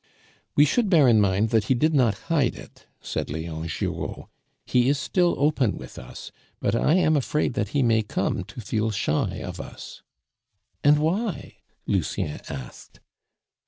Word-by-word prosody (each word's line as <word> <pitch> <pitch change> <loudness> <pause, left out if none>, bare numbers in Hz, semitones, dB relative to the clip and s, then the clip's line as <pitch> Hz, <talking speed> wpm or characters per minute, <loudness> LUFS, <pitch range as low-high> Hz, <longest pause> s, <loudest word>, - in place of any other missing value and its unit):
"We 145 - +6
should 215 - +1
bear 160 -7 +6
in 110 -3 +5
mind 100 +2 +2
that 110 -3 +2
he 130 - +2
did 155 +6 +2
not 120 -8 +3
hide 150 -7 +1
it," - - -14
said - - -4
Leon 80 +1 -4
Giraud; 80 - -4 0.4
"he 125 +1 +2
is 145 - +2
still 175 +6 +1
open 140 -6 +1
with 65 - -10
us; 60 - -10 0.3
but - - 0
I 155 - +3
am 160 -4 +3
afraid 145 -1 0
that 105 -5 -1
he 140 +6 0
may 115 -2 +3
come 105 - -2
to - - -9
feel 110 +1 -1
shy 100 -8 -1
of - - -6
us." - - -10 0.8
"And 145 +1 +6
why?" 180 +6 -2 0.3
Lucien 75 - -2
asked. 65 -4 -9
125 Hz, 160 wpm, -25 LUFS, 100-150 Hz, 0.8 s, We